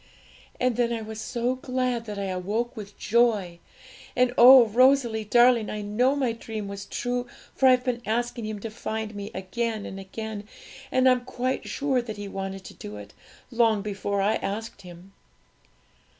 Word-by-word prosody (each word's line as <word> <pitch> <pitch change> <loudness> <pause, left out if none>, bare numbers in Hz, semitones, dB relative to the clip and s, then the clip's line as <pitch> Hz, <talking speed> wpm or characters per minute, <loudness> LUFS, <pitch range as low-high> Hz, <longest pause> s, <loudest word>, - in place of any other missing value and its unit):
And 250 -2 +1
then 240 -1 +1
I 230 -1 -2
was 220 0 -7
so 240 +2 -1
glad 255 -2 -2
that 210 -2 -6
I 200 - -2
awoke 200 +6 -2
with 210 -2 -9
joy! 210 -6 +1 0.6
And 250 0 +3
oh, 250 0 +9
Rosalie 235 -1 +3
darling, 240 0 +4
I 210 -1 -4
know 245 +7 +2
my 265 -4 0
dream 225 -2 -6
was 200 0 -7
true, 245 0 -3 0.3
for 265 - +3
I've 255 -1 +5
been 245 -2 -2
asking 235 0 -2
Him 215 -1 -4
to 225 - -5
find 220 -1 -4
me 205 0 -6
again 215 +3 -3
and 195 - -7
again, 210 +2 -7 0.4
and 255 0 +3
I'm 255 -1 +4
quite 255 +1 -3
sure 270 -3 0
that 220 -3 -7
He 205 0 -6
wanted 195 0 -5
to - - -10
do 105 0 -9
it, 105 -1 -11 0.4
long 225 -4 +2
before 200 -1 -2
I 210 +2 +2
asked 210 +1 -5
Him.' 180 +1 -13
225 Hz, 175 wpm, -26 LUFS, 205-245 Hz, 0.6 s, oh